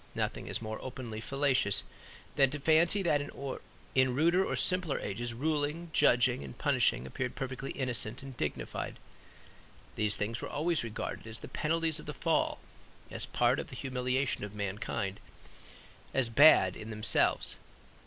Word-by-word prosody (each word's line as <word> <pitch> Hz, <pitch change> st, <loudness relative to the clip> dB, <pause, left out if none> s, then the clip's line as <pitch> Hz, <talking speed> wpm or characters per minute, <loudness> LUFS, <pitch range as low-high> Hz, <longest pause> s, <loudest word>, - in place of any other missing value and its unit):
Nothing -, -, -2 dB
is -, -, -3 dB
more 110 Hz, 0 st, -5 dB
openly 120 Hz, -4 st, -6 dB
fallacious 135 Hz, -5 st, +2 dB, 0.5 s
than 135 Hz, -2 st, +5 dB
to 145 Hz, +2 st, -4 dB
fancy 165 Hz, +7 st, +4 dB
that 150 Hz, -5 st, +2 dB
in 130 Hz, -2 st, -2 dB
ruder 170 Hz, +6 st, +4 dB
or -, -, -1 dB
simpler 180 Hz, -5 st, +2 dB
ages 120 Hz, +4 st, -3 dB
ruling, 155 Hz, +4 st, -1 dB
judging 120 Hz, -, +4 dB
and 65 Hz, -2 st, -9 dB
punishing 65 Hz, -, +2 dB
appeared 125 Hz, -, -4 dB
perfectly 130 Hz, 0 st, -4 dB
innocent 125 Hz, -2 st, -1 dB
and 135 Hz, -2 st, -9 dB
dignified. 75 Hz, -, -4 dB, 1.0 s
These 105 Hz, -1 st, +1 dB
things 115 Hz, +3 st, -3 dB
were -, -, -5 dB
always 165 Hz, 0 st, 0 dB
regarded 115 Hz, 0 st, -5 dB
as 110 Hz, 0 st, -4 dB
the -, -, -8 dB
penalties 165 Hz, 0 st, 0 dB
of -, -, -11 dB
the 150 Hz, -, -5 dB
Fall; 165 Hz, -2 st, +1 dB, 0.5 s
as -, -, -5 dB
part -, -, +2 dB
of -, -, -5 dB
the -, -, -10 dB
humiliation 130 Hz, 0 st, -1 dB
of 105 Hz, 0 st, -6 dB
mankind, 100 Hz, -1 st, -3 dB, 1.0 s
as 130 Hz, -3 st, +2 dB
bad 115 Hz, -8 st, +7 dB
in 110 Hz, -, -8 dB
themselves. 110 Hz, 0 st, +1 dB
130 Hz, 150 wpm, -31 LUFS, 110-150 Hz, 1.0 s, bad